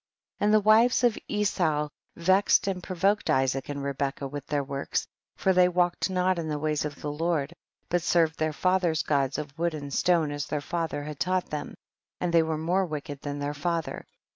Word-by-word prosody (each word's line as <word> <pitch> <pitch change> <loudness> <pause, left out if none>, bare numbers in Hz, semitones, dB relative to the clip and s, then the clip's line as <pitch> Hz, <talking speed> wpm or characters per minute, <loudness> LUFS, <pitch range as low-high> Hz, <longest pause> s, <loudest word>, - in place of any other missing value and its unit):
14. - - +1
And 210 - +4
the 210 -2 +3
wives 230 +4 +5
of 240 -3 +4
Esau 175 -8 +1 0.3
vexed 190 +5 +3
and 190 -2 -2
provoked 195 +4 0
Isaac 135 0 +1
and 140 -1 -4
Rebecca 140 0 -2
with 145 +1 -7
their 145 -1 0
works, 140 0 -2 0.3
for 190 - +2
they 180 0 +5
walked 175 +1 +1
not 185 -1 +1
in 160 - -3
the 150 - -1
ways 150 0 -1
of 145 -1 -6
the 150 - -3
Lord, 160 -1 -1 0.3
but 175 0 +1
served 165 -1 +2
their 155 0 +1
father's 180 0 +1
gods 140 -2 +1
of 145 -2 -6
wood 170 -1 0
and 145 -2 -6
stone 165 -3 +2
as 145 -1 -4
their 150 - -1
father 160 -1 -3
had 150 -1 -7
taught 185 0 0
them, 150 -1 -4 0.4
and 175 -1 -1
they 165 - +6
were 160 -1 -1
more 180 +4 +1
wicked 145 -3 -6
than 145 0 -4
their 145 0 -2
father. 165 +2 -3
160 Hz, 200 wpm, -27 LUFS, 145-180 Hz, 0.4 s, they